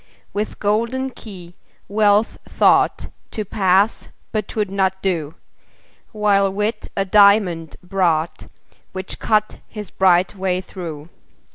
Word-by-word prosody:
With 210 Hz, +1 st, -3 dB
golden 235 Hz, +6 st, -1 dB
key 185 Hz, -8 st, -11 dB, 0.3 s
Wealth 210 Hz, +1 st, +2 dB
thought -, -, +3 dB, 0.2 s
To 215 Hz, -, -4 dB
pass 195 Hz, +2 st, +1 dB, 0.2 s
but 215 Hz, -2 st, -2 dB
'twould 210 Hz, -3 st, -2 dB
not 190 Hz, -1 st, 0 dB
do: 165 Hz, -5 st, -1 dB, 0.8 s
While 200 Hz, -2 st, +2 dB
Wit 210 Hz, +2 st, -2 dB
a 195 Hz, -, +1 dB
diamond 195 Hz, -5 st, +4 dB
brought, 175 Hz, -3 st, 0 dB, 0.5 s
Which 185 Hz, 0 st, -6 dB
cut 215 Hz, -1 st, 0 dB
his 210 Hz, -4 st, -8 dB
bright 185 Hz, -1 st, +3 dB
way 185 Hz, -1 st, -1 dB
through. 170 Hz, -5 st, -8 dB
195 Hz, 115 wpm, -20 LUFS, 180-210 Hz, 0.8 s, diamond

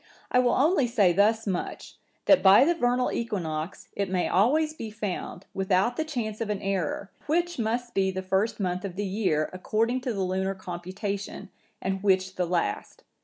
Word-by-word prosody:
I 250 Hz, -, +4 dB
will 245 Hz, -1 st, +3 dB
only 285 Hz, -1 st, +3 dB
say 205 Hz, -7 st, +3 dB
thus 215 Hz, +4 st, +3 dB
much, 185 Hz, -4 st, -4 dB, 0.3 s
that 290 Hz, -, +6 dB
by 195 Hz, +7 st, +7 dB
the 340 Hz, -, +3 dB
vernal 250 Hz, -5 st, +1 dB
equinox, 175 Hz, -7 st, -3 dB
it 200 Hz, -1 st, -1 dB
may 185 Hz, -1 st, 0 dB
always 300 Hz, -, +3 dB
be 230 Hz, -8 st, -6 dB
found, 205 Hz, -3 st, -5 dB
without 195 Hz, +5 st, +1 dB
the 315 Hz, -, 0 dB
chance 235 Hz, -8 st, -4 dB
of 225 Hz, -, -2 dB
an 205 Hz, -2 st, -1 dB
error, 195 Hz, 0 st, -2 dB, 0.2 s
which 345 Hz, 0 st, 0 dB
must 235 Hz, +2 st, -1 dB
be 190 Hz, -1 st, +2 dB
the 190 Hz, 0 st, -4 dB
first 195 Hz, +5 st, 0 dB
month 180 Hz, -2 st, -1 dB
of 190 Hz, -3 st, -5 dB
the 205 Hz, +2 st, -2 dB
year, 190 Hz, -6 st, 0 dB
according 225 Hz, +7 st, 0 dB
to 250 Hz, -2 st, -2 dB
the 195 Hz, -, -1 dB
lunar 190 Hz, +1 st, -1 dB
computation, 190 Hz, +3 st, -5 dB, 0.3 s
and 190 Hz, 0 st, -1 dB
which 190 Hz, -1 st, +2 dB
the 180 Hz, -1 st, -1 dB
last. 175 Hz, 0 st, -2 dB
200 Hz, 180 wpm, -27 LUFS, 185-240 Hz, 0.3 s, by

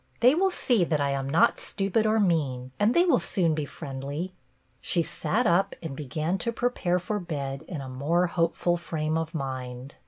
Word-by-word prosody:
They 250 Hz, +3 st, +7 dB
will 380 Hz, +4 st, +3 dB
see 245 Hz, -, +2 dB
that 160 Hz, -3 st, 0 dB
I 140 Hz, -1 st, +1 dB
am 135 Hz, 0 st, -2 dB
not 160 Hz, +4 st, +4 dB
stupid 200 Hz, +2 st, 0 dB
or 220 Hz, +1 st, +3 dB
mean, 140 Hz, -10 st, 0 dB
and 210 Hz, +3 st, +3 dB
they 345 Hz, +1 st, +5 dB
will 305 Hz, -9 st, +4 dB
soon 170 Hz, -5 st, +1 dB
be 150 Hz, -1 st, -2 dB
friendly." 145 Hz, +5 st, -5 dB, 0.5 s
She 170 Hz, -, +1 dB
sat 225 Hz, +8 st, 0 dB
up 195 Hz, +1 st, +2 dB
and 155 Hz, -4 st, -5 dB
began 155 Hz, +6 st, -2 dB
to 235 Hz, -, -1 dB
prepare 230 Hz, -7 st, 0 dB
for 205 Hz, +4 st, -2 dB
bed 140 Hz, -6 st, -4 dB
in 160 Hz, -6 st, -5 dB
a 135 Hz, -, -7 dB
more 145 Hz, +8 st, +1 dB
hope 170 Hz, -1 st, 0 dB
ful 175 Hz, 0 st, +1 dB
frame 160 Hz, -2 st, -2 dB
of 165 Hz, +1 st, -2 dB
mind. 130 Hz, -2 st, -5 dB
165 Hz, 195 wpm, -27 LUFS, 140-195 Hz, 0.5 s, They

